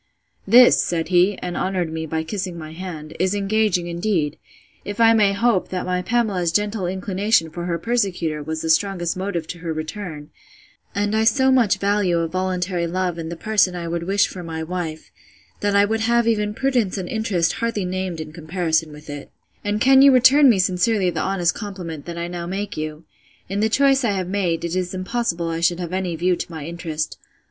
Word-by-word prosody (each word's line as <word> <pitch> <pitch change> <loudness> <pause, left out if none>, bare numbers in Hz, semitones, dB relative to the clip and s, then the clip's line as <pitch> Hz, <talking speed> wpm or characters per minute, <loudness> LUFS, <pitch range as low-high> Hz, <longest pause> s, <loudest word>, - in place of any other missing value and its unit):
This, 245 +4 +7
said 165 -1 -2
he, 185 +2 +3
(and 180 -1 -4
honoured 180 -4 -1
me 160 0 -4
by 160 +1 -2
kissing 185 0 -4
my 155 -1 -8
hand,) 160 -3 -7
is 185 +2 +1
engaging, 200 -3 +1
indeed; 170 -3 -1 0.5
if 205 +1 -6
I 230 0 +6
may 210 -3 +4
hope, 200 -1 +1
that 185 -1 -3
my 180 0 -1
Pamela's 195 -5 0
gentle 205 0 0
inclination 190 -2 0
for 175 +2 -5
her 170 -1 -1
persecutor 180 -7 -1
was 160 +2 -4
the 160 - +2
strongest 175 0 +1
motive 185 -3 -3
to 175 - -6
her 165 -1 -4
return; 155 -1 -6 0.6
and 205 +1 0
I 220 - +2
so 265 +3 +4
much 245 -6 +3
value 200 -3 +1
a 165 0 0
voluntary 180 0 -1
love 180 0 -2
in 160 0 -5
the 170 - -5
person 195 -1 +1
I 170 -1 -4
would 170 0 -2
wish 195 +4 +2
for 185 - -8
my 160 -2 -5
wife, 160 -2 -5 0.5
that 205 0 0
I 200 0 +6
would 220 +2 -1
have 235 +1 +2
even 210 -2 0
prudence 245 -8 0
and 185 -2 -4
interest 190 -7 0
hardly 230 -4 -2
named 185 -2 -3
in 155 -1 -7
comparison 160 -1 -1
with 150 +1 -13
it: 145 -1 -7 0.3
And 205 +1 -1
can 265 +3 +6
you 275 0 +8
return 265 +3 +6
me 225 - +4
sincerely 185 +1 +1
the - - -2
honest 180 -3 +1
compliment 175 -7 -7
I 170 0 -4
now 175 -1 -5
make 200 +3 -4
you?—In 155 +5 -7
the 220 +1 +2
choice 275 +2 +3
I 220 -4 +1
have 185 -2 -2
made, 180 -4 -1
it 170 +1 -3
is 185 0 -2
impossible 185 -4 -2
I 165 0 -2
should 170 +1 +1
have 175 0 -5
any 185 -2 -2
view 180 +2 +1
to - - -6
my 160 -3 -6
interest. 160 -2 -4
185 Hz, 200 wpm, -22 LUFS, 170-205 Hz, 0.6 s, you